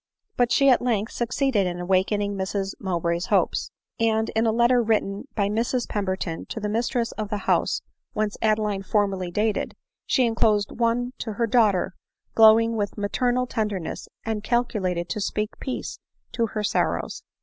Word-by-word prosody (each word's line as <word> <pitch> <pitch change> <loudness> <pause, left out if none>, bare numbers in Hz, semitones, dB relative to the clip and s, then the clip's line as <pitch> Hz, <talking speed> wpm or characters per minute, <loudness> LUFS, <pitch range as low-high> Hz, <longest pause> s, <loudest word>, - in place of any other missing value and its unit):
But 245 -1 +2
she 275 - +4
at 255 -3 +5
length 225 -3 0
succeeded 240 -4 0
in 175 0 -4
awakening 195 +3 +1
Mrs 195 0 -2
Mowbray's 170 -2 -1
hopes; - - +1 0.3
and 220 -1 +2
in 225 +1 +1
a - - +3
letter 240 +2 +4
written 215 -1 0
by 200 -2 +1
Mrs 230 +4 -1
Pemberton 190 -5 -3
to - - -5
the 210 -1 -2
mistress 235 +1 0
of 215 -1 -3
the 210 - -1
house - - +1 0.3
whence 210 -1 -1
Adeline 215 -2 +1
formerly 195 -2 0
dated, 210 +4 -1 0.3
she 255 - +3
enclosed 220 -3 +2
one 240 +2 0
to 220 - -4
her 235 +3 0
daughter 215 -5 +2 0.4
glowing 225 +1 +6
with 205 -1 -2
maternal 245 +5 0
tenderness, 210 -8 -3 0.2
and 220 -2 -2
calculated 195 -8 0
to 210 - -2
speak 210 +1 -1
peace 260 - -5 0.3
to 230 -1 0
her 215 -1 -4
sorrows. - - -1
215 Hz, 160 wpm, -24 LUFS, 200-230 Hz, 0.4 s, glowing